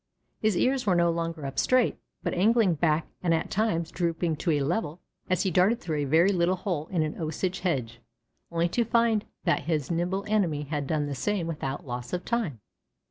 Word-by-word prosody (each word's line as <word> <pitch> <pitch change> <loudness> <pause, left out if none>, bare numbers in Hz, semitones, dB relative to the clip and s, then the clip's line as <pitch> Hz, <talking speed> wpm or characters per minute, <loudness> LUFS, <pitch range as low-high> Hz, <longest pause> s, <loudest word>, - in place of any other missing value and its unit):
His 215 -4 +1
ears 255 -3 +1
were 185 - +4
no 170 0 +3
longer 165 -2 -3
up 135 0 -3
straight, 255 -2 +3 0.3
but - - -1
angling 210 0 +4
back 155 0 +1 0.2
and 170 -2 +2
at 160 - -3
times 170 -6 0
drooping 170 -2 -1
to 170 - -2
a 145 - +1
level, 165 +2 -1 0.3
as 185 -2 +2
he 190 - 0
darted 190 +7 +3
through 160 -3 -3
a 145 - 0
very 165 +7 +4
little 180 0 +2
hole 175 -5 -3
in 170 -4 0
an 155 +2 -4
Osage 175 +4 -2
hedge, 125 -10 -2 0.5
only 170 0 +1
to 235 - +1
find 230 -2 +2 0.2
that 170 -6 +1
his 155 -2 -1
nimble 180 +4 -1
enemy 180 -9 +1
had 145 -1 -3
done 150 -1 0
the 145 - -3
same 190 +6 -1
without 150 -4 -4
loss 125 -1 -6
of 180 0 -2
time. 195 - -1
170 Hz, 200 wpm, -27 LUFS, 150-190 Hz, 0.5 s, were